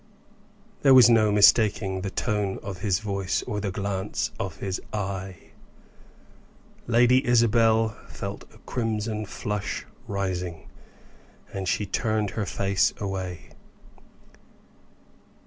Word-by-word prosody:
There 135 -2 +6
was 125 -2 +8
no 110 -2 +4
mistaking 105 -2 +4
the 100 - -3
tone 105 -2 -1
of 95 -3 -6
his 95 -2 +1
voice 100 -3 -2
or 105 - -3
the 100 - -2
glance 100 +2 -3
of 95 -5 -4
his 95 -1 -4
eye. 95 -3 -5 1.4
Lady 120 +3 +4
Isabel 115 -2 +3 0.2
felt - - -7
a - - -18
crimson 110 -2 -2
flush 105 +1 -4 0.2
rising 90 -4 -3 0.9
and 95 -1 -4
she 105 - 0
turned 110 0 -1
her 105 -1 -3
face 100 -1 +1
away. 95 -5 -5
105 Hz, 110 wpm, -25 LUFS, 95-110 Hz, 1.4 s, was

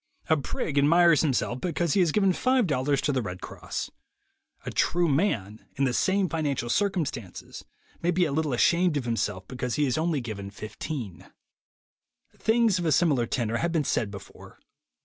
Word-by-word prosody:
A - - +7
prig 145 +1 -2
admires 165 +1 +5
himself 130 -4 0
because 175 -3 0
he - - +2
has 175 -4 +3
given 195 +2 +3
$5 165 - +1
to 150 - 0
the 130 -2 0
Red 90 -4 -6
Cross. - - -6 0.7
A - - -4
true 175 0 +1
man, 115 - -1
in 140 - 0
the 130 -2 +1
same 190 +5 +2
financial 145 -8 -2
circumstances, 155 - -2 0.4
may 170 - 0
be 180 0 +3
a 155 - -2
little 155 0 0
ashamed 170 +6 +3
of 135 - -3
himself 105 -5 -2
because 125 -1 -3
he 150 - +2
has 130 +1 0
only 160 -2 0
given 105 -5 -6
$15. 110 - -7 1.0
Things 225 -4 +2
of 175 - -3
a - - +2
similar 145 -6 +3
tenor 115 -1 -1
have 170 +7 -1
been 160 -3 +1
said 110 -5 0
before. 100 -1 -12
145 Hz, 170 wpm, -26 LUFS, 120-175 Hz, 1.0 s, A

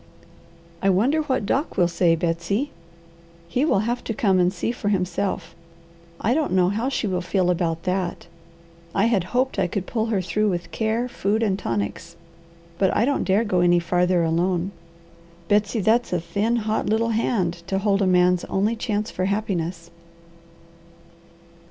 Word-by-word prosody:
I 195 - +2
wonder 245 +12 +3
what 260 -8 -1
Doc 275 +9 -1
will 175 - +4
say, 170 -1 +2
Betsy? 175 - -1 0.8
He 245 +10 0
will 250 -10 +2
have 240 +3 -2
to 225 - -3
come 195 -4 +2
and 180 0 +3
see 190 +4 -2
for 230 -4 -3
himself. 185 -2 -1 0.7
I 230 - +1
don't 305 -5 0
know 180 -1 +4
how 225 +6 -1
she 265 - -2
will 185 -3 -1
feel 180 0 +1
about 165 -2 -1
that. 185 -1 -2 0.7
I 200 - +3
had 215 -7 +2
hoped 255 +7 0
I 185 - +2
could 185 +2 -3
pull 225 +1 -1
her 215 -3 0
through 210 +3 0
with 175 -2 -3
care, 220 +6 -1
food, 220 -2 -1
and 200 -3 0
tonics, 115 - -3 0.6
but 190 -2 +3
I 230 - +3
don't 280 +1 0
dare 200 +4 +3
go 190 -5 0
any 175 0 +4
farther 180 +1 +2
alone. 175 +3 0 0.8
Betsy, 205 +3 +2
that's 230 +5 +2
a 180 - +1
thin, 200 +8 -1
hot, 220 -1 -1
little 225 +2 +1
hand 195 -6 0
to 195 - 0
hold 200 0 +1
a 195 - +2
man's 180 -1 +3
only 210 +4 0
chance 215 -1 -2
for 185 - -2
happiness." 180 -4 -2
195 Hz, 170 wpm, -23 LUFS, 180-220 Hz, 0.8 s, will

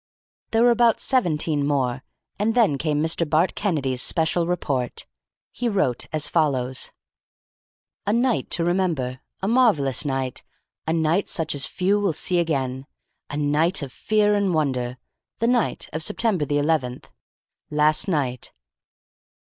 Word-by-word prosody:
There 225 +1 +2
were 245 - +6
about 235 -1 +3
seventeen 160 - +1
more, 135 -3 -1 0.4
and 220 +3 +1
then 205 - +3
came 150 0 0
Mr. 165 0 +1
Bart 160 +5 +2
Kennedy's 140 - -1
special 165 +2 +1
report. 140 -8 -2 0.5
He 245 -1 -2
wrote 190 - 0
as 155 -1 +2
follows: 130 -5 0 1.2
"A - - +3
night 240 +1 +1
to 170 - +1
remember. 165 -8 -1 0.2
A - - 0
marvellous 200 - +3
night. 135 -3 -2 0.5
A - - +1
night 165 +4 +1
such 160 -3 0
as 140 -2 -1
few 195 +3 +1
will 200 -5 0
see 175 +4 +1
again. 135 -5 -2 0.4
A 145 - -4
night 150 +4 +1
of 135 -2 -7
fear 210 -1 +1
and 200 -4 +1
wonder. 130 -5 -1 0.4
The 230 - 0
night 245 -2 0
of 155 - -3
September 190 -3 0
the 145 +1 0
eleventh. 145 -4 -1 0.6
Last 150 +3 +3
night. 135 -8 -1
155 Hz, 140 wpm, -23 LUFS, 140-195 Hz, 1.2 s, were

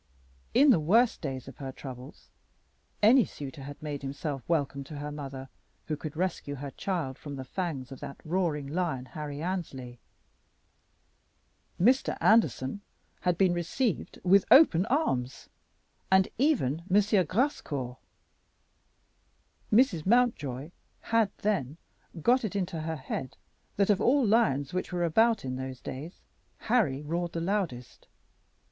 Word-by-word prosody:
In 280 +1 +7
the 215 - +4
worse 220 +10 +4
days 135 -5 -6
of 135 - -11
her 135 -2 -6
troubles 130 0 -10 0.7
any 240 +4 +7
suitor 145 -4 -8
had 145 +1 -8
made 145 -2 -4
himself 140 0 -4
welcome 140 -4 0
to 150 +1 -8
her 145 +1 -5
mother 135 -2 -7 0.4
who 155 - -3
would 155 -1 -5
rescue 170 -5 -2
her 140 0 -6
child 165 -9 -3
from 145 -2 -7
the 135 - -6
fangs 140 -4 -4
of 135 - -8
that 140 - -8
roaring 160 -4 0
lion, 150 -4 -2
Harry 150 +1 -6
Annesley. 135 -10 -4 1.8
Mr. 250 +9 +3
Anderson 205 -7 +3 0.4
had 180 -2 0
been 185 -2 +4
received 175 +6 -2
with 190 +2 +5
open 210 - +7
arms, 130 - -1 0.6
and 190 +1 +5
even 245 - +2
M. 195 +3 +5 0.3
Grascour. 145 - -1 1.7
Mrs. 210 - +3
Mountjoy 170 - +1 0.3
had 225 -2 +2
then 165 -9 0 0.5
got 250 +1 +4
it 210 -2 -3
into 180 -4 -2
her 160 +1 -3
head 130 -2 -5 0.4
that 200 +1 +3
of 200 -1 +1
all 265 +3 +4
lions 145 - +2
which 185 - -3
were 175 -1 -1
about 220 - +3
in 130 0 -3
those 130 -1 -6
days 150 +7 -8 0.4
Harry 170 - +1
roared 170 +3 -2
the 170 - -2
loudest. 170 - -3
160 Hz, 135 wpm, -29 LUFS, 135-200 Hz, 1.8 s, In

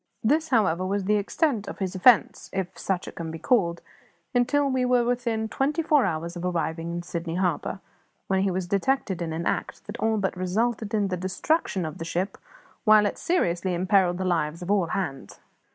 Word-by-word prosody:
This, 310 +7 +2
however, 190 -8 +2
was 195 +1 -1
the 210 +2 +2
extent 220 - 0
of - - -6
his 190 -1 -3
offence 200 +4 +4
if 190 -2 -3
such 190 -2 -2
it - - -7
can 165 -1 -5
be 165 - -5
called 170 -4 +1 0.5
until 255 +4 +2
we 260 -1 +1
were 250 -1 +3
within 235 -2 -1
twenty 290 +8 0
four 300 -3 +4
hours 170 -1 -3
of 175 - -6
arriving 165 -1 -2
in 175 0 -4
Sydney 170 -1 -4
Harbour, 185 +1 -1 0.4
when 190 -1 +1
he 195 - +2
was 185 0 -2
detected 195 0 0
in 165 -1 -2
an 165 +1 -3
act - - -2
that 205 - -7
all 220 0 +1
but 195 -2 -1
resulted 215 +4 -1
in 205 -2 +1
the 180 - -2
destruction 190 - -1
of 155 - -6
the 165 - -4
ship, 180 +4 -2 0.4
while 215 -1 +6
it 205 - -2
seriously 180 - 0
imperilled 185 0 +2
the 185 - -2
lives 170 -1 -1
of 180 - -2
all 195 -4 +2
hands. 160 -7 -4
190 Hz, 200 wpm, -26 LUFS, 175-225 Hz, 0.5 s, while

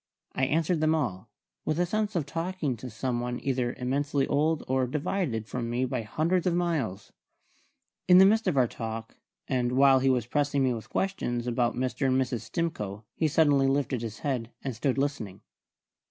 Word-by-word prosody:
I 130 - +1
answered 160 +3 +1
them 155 0 +3
all, 110 - -3 0.3
with 155 +1 -1
a 175 - +3
sense 210 +2 -1
of 165 -5 0
talking 165 -2 -2
to 125 +3 -8
some 120 +2 -2
one 120 0 -3
either 125 -2 -1
immensely 140 +2 0
old 155 +2 +1
or 130 0 +1
divided 140 - -2
from 120 -1 -3
me 125 +2 0
by 125 -1 -2
hundreds 165 +11 0
of 175 - +2
miles. 150 - -2 0.9
In 180 0 +8
the 190 - +9
midst 220 +2 +3
of 170 -6 +1
our 125 -2 +4
talk, 115 0 -6 0.3
and 125 -2 0
while 135 0 +6
he 135 +1 +2
was 125 -3 +2
pressing 145 +2 +1
me 130 -1 +2
with 115 -2 -7
questions 120 -11 -1
about 120 0 0
Mr. 130 +2 -1
and 130 0 +3
Mrs. 125 -3 -1
Stimcoe, 105 - -3
he 160 - +1
suddenly 145 -3 +4
lifted 135 -3 0
his 115 -1 -5
head, 125 -5 -1
and 130 -3 -3
stood 130 +3 0
listening. 135 -9 -2
135 Hz, 185 wpm, -28 LUFS, 120-155 Hz, 0.9 s, the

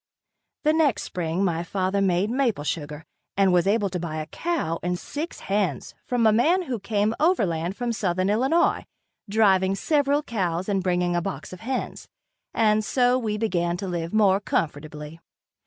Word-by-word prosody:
The 305 0 +3
next 305 -8 +2
spring 175 +1 -2
my 170 -2 0
father 190 +2 -1
made 190 +2 +1
maple 245 - 0
sugar 150 0 -4 0.3
and 195 -2 +4
was 180 +1 +3
able 205 0 +2
to 180 - -3
buy 165 -2 -4
a 155 0 -3
cow 285 - -2
and 180 0 -1
six 300 - -6
hens 200 -1 -1
from 245 -2 +1
a 220 - +5
man 335 - +3
who 255 -8 -4
came 210 +1 0
overland 190 - +1
from 245 -1 -1
southern 185 -3 0
Illinois, 265 +11 +2 0.4
driving 195 -3 +3
several 285 +5 +1
cows 185 - -2
and 195 -2 0
bringing 180 -1 0
a 175 - +1
box 190 0 -6
of 185 - -9
hens, 255 +6 -4 0.4
and 215 -1 +2
so 250 +2 +2
we 215 -3 -2
began 175 -5 0
to 195 +1 -5
live 170 -2 -3
more 200 -3 +4
comfortably. 150 -3 -3
195 Hz, 170 wpm, -24 LUFS, 175-235 Hz, 0.4 s, a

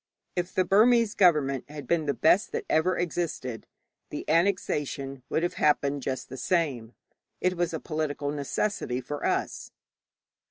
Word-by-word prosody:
If 175 0 -2
the 185 - +1
Burmese 225 +3 +4
government 145 - +3
had 150 -1 -8
been 165 -3 0
the 140 - +1
best 180 +6 +3
that - - -2
ever 180 +4 +2
existed, 160 -9 -3 0.4
the - - -6
annexation 150 -6 0
would 160 - 0
have 175 - 0
happened 145 -1 +2
just 130 0 -3
the 130 - -8
same. 130 -6 -1 0.4
It 185 0 +1
was 175 -1 0
a 160 - -3
political 150 -2 -2
necessity 145 -1 -2
for 145 +3 -6
us. - - -1
155 Hz, 150 wpm, -27 LUFS, 140-180 Hz, 0.4 s, Burmese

